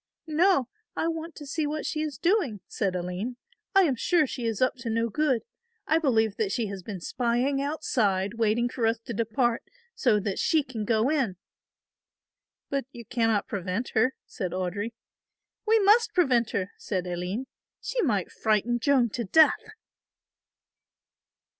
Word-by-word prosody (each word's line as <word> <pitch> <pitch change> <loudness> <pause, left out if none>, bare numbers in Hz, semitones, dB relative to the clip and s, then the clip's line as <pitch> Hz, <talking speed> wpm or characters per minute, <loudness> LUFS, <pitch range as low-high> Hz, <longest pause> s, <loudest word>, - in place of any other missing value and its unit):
"No, 320 -3 +3 0.3
I - - 0
want 330 0 -4
to 295 - -9
see 295 +2 -1
what 305 +1 -3
she 305 - -2
is 305 -3 -3
doing," 340 - +1
said 190 -3 -1
Aline; 180 +7 -3 0.4
"I 390 - +7
am 285 -7 +2
sure 325 +6 +2
she 245 -2 -5
is 225 -3 -1
up 255 - +3
to 235 -1 -5
no 230 +1 0
good. 265 0 +1 0.4
I 315 - +3
believe 225 -9 +2
that 210 -3 0
she 230 - 0
has 195 -1 -6
been 190 0 -6
spying 250 +8 0
outside 215 -10 0
waiting 225 +2 +2
for 240 -2 -1
us 225 +1 +1
to 235 - -4
depart, 230 +2 0 0.3
so 235 - +2
that 200 -1 -3
she 315 -3 +3
can 235 -5 -5
go 225 +4 +2
in." 260 - 0 1.3
"But 275 -2 -1
you 235 -3 -10
cannot 225 -3 +1
prevent 195 +4 -3
her," 250 +4 +2
said 185 -6 -5
Audry. 190 +5 -3 0.7
"We 445 +1 +5
must 435 +2 +4
prevent 255 - +3
her," 195 0 -2
said 185 -2 -2
Aline; 180 +7 -3 0.3
"she - - -2
might 210 - 0
frighten 220 +2 +1
Joan 260 -2 +3
to 235 +3 -3
death." 315 - +5
235 Hz, 160 wpm, -27 LUFS, 210-295 Hz, 1.3 s, I